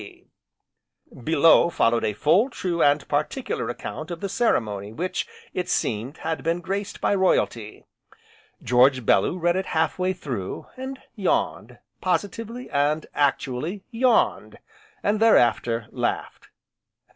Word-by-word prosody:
K.C.B. 105 +4 -19
Below 160 +3 +5
followed 115 -7 +2
a 105 - 0
full, 180 - +3
true, 175 -8 -2
and 145 +1 +3
particular - - -2
account 155 +2 -6
of 170 -1 -5
the 200 - -4
ceremony 105 - 0
which, 185 - -3 0.3
it 180 - -3
seemed, 120 +7 -1
had 160 0 -3
been 165 +2 0
graced 195 +3 -4
by - - +2
Royalty. 120 - 0 0.8
George 125 +1 +4
Bellew 100 - +3
read 175 0 +1
it 190 0 -2
half 160 +2 +1
way 185 +1 +1
through, 130 - -5
and 265 +1 -6 0.2
yawned, - - -1 0.2
positively, 230 +4 -2
and 145 +2 +1
actually, 145 +6 -1
yawned, 245 0 +1 0.5
and 210 +1 +1
thereafter, 120 - +3
laughed. - - -3
165 Hz, 125 wpm, -24 LUFS, 125-195 Hz, 0.8 s, Below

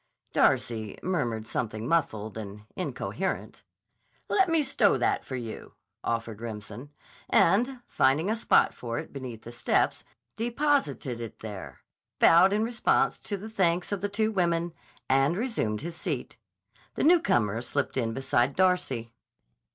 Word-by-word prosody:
Darcy 110 -3 +1
murmured 120 -12 -1
something 110 -1 -3
muffled 110 -11 0
and 105 -1 -7
incoherent. 185 - -3 0.7
"Let 385 -3 +3
me 325 -2 +3
stow 270 - +3
that - - +1
for 130 - -6
you," 115 -3 -7 0.3
offered 115 -2 -3
Remsen, 110 +3 -7 0.4
and, 245 +8 +3
finding 145 +7 +2
a 220 - +1
spot 230 - +3
for 120 -1 -5
it - - -6
beneath 125 -5 -7
the 120 - -8
steps, 120 - +1 0.3
deposited 235 - 0
it 115 - -8
there, 105 -4 -8 0.4
bowed 175 +4 +7
in 210 +2 +2
response 230 0 +1
to 200 - -4
the 205 +3 -8
thanks 180 -5 +1
of 200 -3 -2
the 205 - -1
two 215 +2 0
women, 170 -3 0 0.3
and 135 +5 +3
resumed 205 - -1
his 165 +1 -6
seat. - - -4 0.6
The - - -1
newcomer 120 - +3
slipped 140 +3 -2
in 115 -4 0
beside 135 +1 +1
Darcy. 135 -11 +1
140 Hz, 140 wpm, -28 LUFS, -, 0.7 s, bowed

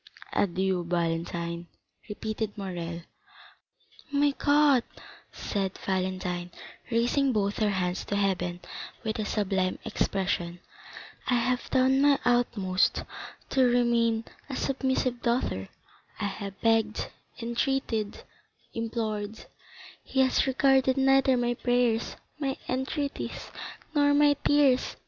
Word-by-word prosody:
"Adieu, 190 -1 +1
Valentine," 170 0 -2 0.4
repeated 215 0 -4
Morrel. 175 -3 -5 1.1
"My 285 0 +3
God," 285 -4 +4 0.5
said 195 -2 -3
Valentine, 185 -2 -1 0.4
raising 245 +4 +2
both 205 -3 0
her 215 -2 +3
hands 180 -2 -1
to 205 - -2
heaven 180 -3 0 0.4
with 220 -1 -2
a 215 - -1
sublime 190 -3 0
expression, 180 -3 -1 0.7
"I 250 - +3
have 245 +1 0
done 265 +1 +3
my 285 -1 +5
utmost 205 -6 +2 0.5
to 265 - +4
remain 235 -2 +3 0.2
a 265 - -3
submissive 260 -2 0
daughter; 235 - 0 0.5
I - - -1
have 200 -1 -5
begged, 225 -1 +1 0.3
entreated, 235 -2 -1 0.5
implored; 220 -2 -3 0.6
he 265 - +1
has 260 +1 +3
regarded 265 0 +3
neither 270 -1 +4
my 240 0 +1
prayers, 245 -2 +1 0.2
my 270 -2 -1
entreaties, 280 +3 -3 0.4
nor 290 -1 +4
my 290 0 +6
tears. 285 -3 +3
230 Hz, 105 wpm, -28 LUFS, 190-260 Hz, 1.1 s, my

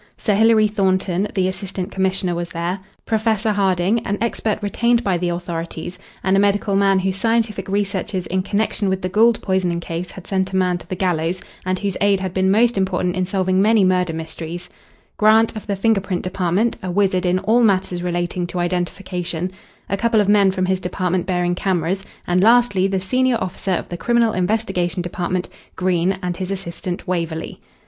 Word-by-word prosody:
Sir 215 - 0
Hilary 220 +1 +5
Thornton, 190 -2 0
the 185 -2 +2
assistant 190 0 -4
commissioner, 190 -1 0
was 170 0 -3
there; 175 +3 -3 0.3
Professor 220 -1 +1
Harding, 195 +1 +2
an 205 -2 -3
expert 225 -1 -1
retained 235 +3 +1
by 195 -4 +1
the 175 0 -1
authorities, 170 0 -5 0.2
and 190 +1 +2
a - - +4
medical 200 0 +2
man 195 -1 +4
whose 190 0 -1
scientific 225 -3 0
researches 195 -2 -1
in 185 +1 -1
connection 205 +1 -1
with 190 0 -2
the 185 - -1
Gould 220 +4 +4
poisoning 185 -3 0
case 170 +1 -5
had 190 - -11
sent 190 -1 -1
a - - -1
man 180 -1 +1
to - - -13
the 185 - -2
gallows, 175 -1 0 0.3
and 185 0 +1
whose 200 -1 -2
aid 200 -1 +3
had 190 -2 -4
been 190 0 +2
most 225 +2 +3
important 180 -1 0
in 185 -1 -1
solving 185 0 +1
many 215 0 +4
murder 180 -2 +2
mysteries; 160 +2 -6 0.5
Grant 220 +1 +4
of 215 - -7
the 200 - 0
finger 210 +1 +2
print 185 -2 -3
department, 185 +4 0
a 185 - -4
wizard 190 0 +1
in 180 +1 +2
all 215 +5 +2
matters 185 -5 +2
relating 175 0 -2
to 180 - -6
identification; 180 0 -2 0.4
a 200 - -1
couple 230 +1 +2
of 205 - +2
men 205 -1 +5
from 185 -1 0
his 190 0 0
department 180 0 -1
bearing 180 -1 +1
cameras, 185 0 -1 0.2
and 180 +1 +2
lastly 220 -3 +4
the 195 -1 0
senior 255 +6 +1
officer 190 +1 -2
of - - -3
the 175 - -5
Criminal 235 +1 +2
Investigation 180 -2 0
Department, 180 +1 -2 0.3
Green, 185 +1 +1
and 180 -1 -2
his 185 -1 -4
assistant, 180 -2 -5
Waverley. 165 -3 -3
190 Hz, 185 wpm, -20 LUFS, 180-205 Hz, 0.5 s, Hilary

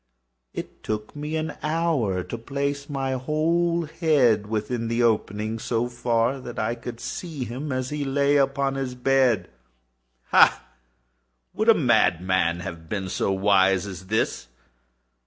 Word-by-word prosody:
It - - -8
took 105 +3 -4
me 150 +2 -4
an 160 0 -2
hour 150 - 0
to - - -6
place 140 +3 -3
my 135 -2 -2
whole 165 +5 +1
head 135 - +2
within 115 +2 -2
the 115 +1 +1
opening 110 -1 0
so 115 +1 -1
far 120 +1 0
that 120 -2 -8
I 110 +2 0
could 120 0 -8
see 155 -5 -5
him 130 +6 -5
as 130 +1 -2
he 150 -1 -2
lay 140 +1 +2
upon 135 0 +1
his 135 -2 -3
bed. 130 -2 +2 0.8
Ha!—would 60 0 0
a - - +8
madman 85 0 +2
have 85 -2 -8
been 95 -2 -3
so 100 - 0
wise 95 -1 +3
as 95 -2 -8
this? 110 - -1
120 Hz, 140 wpm, -24 LUFS, 100-140 Hz, 0.8 s, a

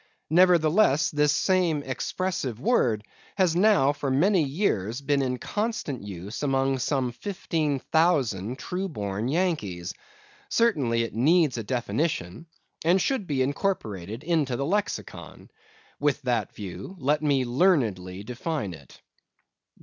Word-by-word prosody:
Nevertheless, 170 -2 +4
this 150 0 +3
same 165 -1 +1
expressive 135 - -3
word 120 - +2 0.3
has 180 -4 +3
now 180 -8 +4
for 145 -1 -3
many 175 +8 +3
years 135 - -1
been 140 0 +1
in 125 -1 -1
constant 210 - -3
use 100 +2 -7
among 135 -1 +1
some 130 -1 0
fifteen 155 - -2
thousand 130 - +1
true 185 +6 -4
born 105 - -3
Yankees. 130 - -1 0.6
Certainly, 135 - +2
it 115 - -5
needs 145 +1 +3
a - - -4
definition, 125 - -2 0.4
and 175 +4 +4
should 225 -1 -1
be 135 -3 +1
incorporated 115 - -3
into 155 -6 +1
the 140 - -2
Lexicon. 205 +6 -4 0.5
With 145 0 0
that 120 -5 -1
view, 105 - -7
let 150 0 +1
me 140 -4 +2
learnedly 115 - +1
define 125 - -4
it. 70 -5 -14
140 Hz, 125 wpm, -26 LUFS, 115-170 Hz, 0.6 s, Nevertheless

